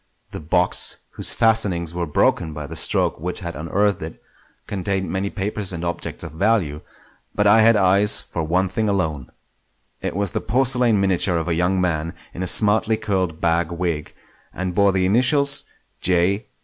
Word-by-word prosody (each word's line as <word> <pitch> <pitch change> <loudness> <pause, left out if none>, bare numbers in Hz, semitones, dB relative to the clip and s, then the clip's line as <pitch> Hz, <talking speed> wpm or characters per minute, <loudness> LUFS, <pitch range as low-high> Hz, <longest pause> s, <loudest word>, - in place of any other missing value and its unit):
The - - -6
box, 90 +3 +1
whose - - +1
fastenings 100 -8 +1
were 85 -1 -3
broken 80 +2 +1
by 75 0 -6
the 80 +3 -8
stroke - - -1
which 90 +4 -5
had 85 -2 -6
unearthed 100 +6 0
it, 80 +1 -8 0.5
contained 95 -1 -3
many 95 +1 -2
papers 100 -1 -3
and 85 -1 -5
objects 85 - -5
of - - -7
value; 80 -4 0 0.5
but 105 - +1
I 105 +2 +6
had 115 +1 +5
eyes 100 +1 +4
for 85 - -6
one 90 +4 +1
thing 110 +3 -1
alone. 80 -10 -2 0.7
It - - -4
was 100 -2 -1
the - - -3
porcelain 125 -3 +2
miniature 95 -2 +1
of 80 0 -3
a 85 - 0
young 90 +3 +1
man 85 -2 -1 0.2
in 90 - -7
a 95 - -2
smartly 110 +3 +3
curled 95 -7 -2
bag 85 0 0
wig, 85 -3 -3 0.4
and 90 0 -4
bore 100 +2 +3
the 95 -1 +1
initials 135 +7 +3 0.3
"J. 95 +4 +1
95 Hz, 175 wpm, -21 LUFS, 85-105 Hz, 0.7 s, I